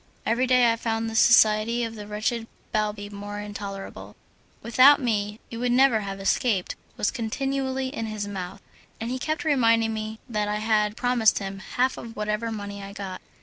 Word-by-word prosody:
Every 245 +3 +1
day 250 -2 +5
I - - -4
found 225 0 -2
the - - -6
society 230 0 +5
of 225 -1 -3
the 210 -2 -8
wretched 225 +2 -2 0.2
Balbi 210 -1 -1
more 205 0 -6
intolerable. 200 -1 -7 0.5
"Without 255 +5 +6
me 210 -4 -1
you 230 - -5
would 245 0 0
never 255 -2 +5
have 195 -1 -5
escaped" 195 0 +1 0.2
was - - +1
continually 265 +3 -2
in 225 -5 -4
his 210 -1 -4
mouth, 195 -1 -6 0.4
and 230 +2 -3
he 255 - -2
kept 310 +4 -2
reminding 230 -6 +3
me 215 0 -4
that 210 -3 -1
I 210 - -1
had 215 -1 +1
promised 245 -3 +3
him 195 -1 -4
half 255 +6 -1
of 230 0 -8
whatever 210 +2 -2
money 205 -2 -6
I 200 0 -8
got. 195 -3 -6
220 Hz, 180 wpm, -25 LUFS, 205-240 Hz, 0.5 s, Without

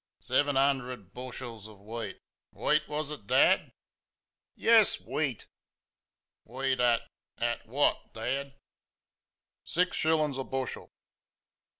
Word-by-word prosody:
"Seven 145 -1 +1
'un 135 0 +4
dered 125 -7 -9
bush 130 +1 -7
els 115 -4 -8
of 105 -2 -14
wheat 105 -1 -6 0.4
WHEAT 150 0 +1
was 150 0 -3
it, 110 -10 -8
Dad?" - - +4 0.8
"Yes, - - +5
WHEAT!" - - -2 1.0
"Wheat 130 +2 -1
at...At 120 -1 -1
WHAT, 135 +6 +1
Dad?" 135 +4 -3 1.1
"Six 180 +1 0
shillings 155 -3 +2
a - - -1
bushel." 130 -1 -4
130 Hz, 105 wpm, -30 LUFS, 115-145 Hz, 1.1 s, Yes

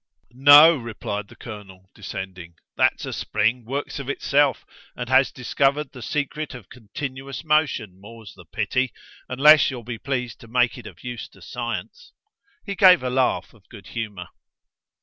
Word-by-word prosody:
"No," 145 +5 +8
replied 105 -4 -5
the - - -16
colonel, 95 -4 -11
descending. 95 -4 -8 0.2
"That's - - +1
a - - -5
spring 115 +3 -1
works 140 +4 -4
of 140 -1 -6
itself 145 +1 +1 0.3
and 125 - -5
has 130 +1 +4
discovered 135 +3 0
the 125 - -11
secret 150 +2 -3
of 115 -6 -12
continuous 130 +4 -7
motion, 145 - 0
more's 110 0 -12
the - - -16
pity! 125 0 -1 0.4
unless 150 +3 +6
you'll 125 -3 -7
be 115 0 -6
pleased 125 -4 -4
to 115 - -14
make 125 +1 +1
it 120 -4 -10
of 90 -4 -14
use 125 -1 -6
to - - -20
Science." 485 +1 -6 0.5
He 200 - -3
gave 185 -5 +6
a 125 - -2
laugh 130 0 0
of 110 -4 -24
good 100 -5 -13
humour. 105 -7 -6
125 Hz, 160 wpm, -23 LUFS, 110-140 Hz, 0.5 s, No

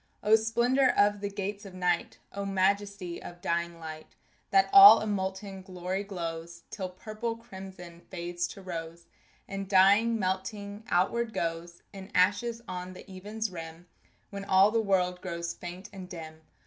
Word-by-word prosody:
O 210 +1 +6
splendor 240 +4 +2
of 205 0 +4
the 200 - -2
gates 200 +1 -4
of 195 -2 -10
night! 175 -10 0 0.2
O 200 - -4
majesty 195 -2 0
of 175 0 -10
dying 170 0 -2
light 155 -1 -9 0.3
That 390 0 +4
all 395 +1 +11
a - - -3
molten 195 -1 -3
glory 185 +1 -4
glows, 170 -3 -6
Till 190 -3 -4
purple 215 +5 -5
crimson 190 -5 -11
fades 175 -1 -3
to 195 - -11
rose 170 -1 -6 0.4
And 195 -1 -5
dying, 205 +4 +5
melting, 200 +2 -3
outward 220 +6 +1
goes 170 +1 -4
In 195 0 -9
ashes 230 +6 +2
on 180 0 -5
the 185 - -12
even's 210 +3 -4
rim, 165 0 -8 0.5
When 200 -1 -6
all 195 +1 +5
the 230 0 +2
world 180 -3 +1
grows 170 -2 -4
faint 180 +3 -8
and 185 -2 -9
dim! 160 -3 -9
190 Hz, 155 wpm, -29 LUFS, 175-205 Hz, 0.5 s, all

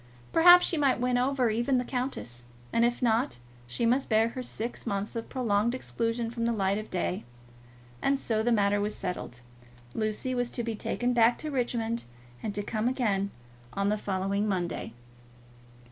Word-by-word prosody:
Perhaps 350 +2 +8
she 335 - +1
might 275 -4 +2
win 250 0 +1
over 255 -2 +2
even 240 +4 +1
the 250 - +1
countess, 245 - -4 0.3
and 230 - +3
if 240 +2 +1
not, 230 - +2 0.3
she 120 - -1
must 250 +4 +2
bear 220 0 +4
her 255 +2 -6
six 235 -1 -4
months 200 +2 -2
of 230 - -4
prolonged 235 -2 +1
exclusion 230 -2 -2
from 230 -1 -2
the 235 - +2
light 200 -2 +1
of 215 - -8
day. 180 0 -2 0.8
And 275 0 +2
so 220 -4 0
the 240 +2 +1
matter 205 -2 +3
was 210 +1 -2
settled. 180 -9 -5 0.5
Lucy 215 +4 -1
was 245 -1 0
to 240 - -3
be 230 0 -2
taken 245 +3 -1
back 235 0 +4
to 310 - -5
Richmond, 235 -3 -1 0.4
and 205 +5 -4
to 205 - -1
come 215 +2 -1
again 210 -6 0 0.4
on 200 0 0
the 210 - +2
following 200 +1 -1
Monday. 175 - -2
230 Hz, 175 wpm, -29 LUFS, 205-245 Hz, 0.8 s, Perhaps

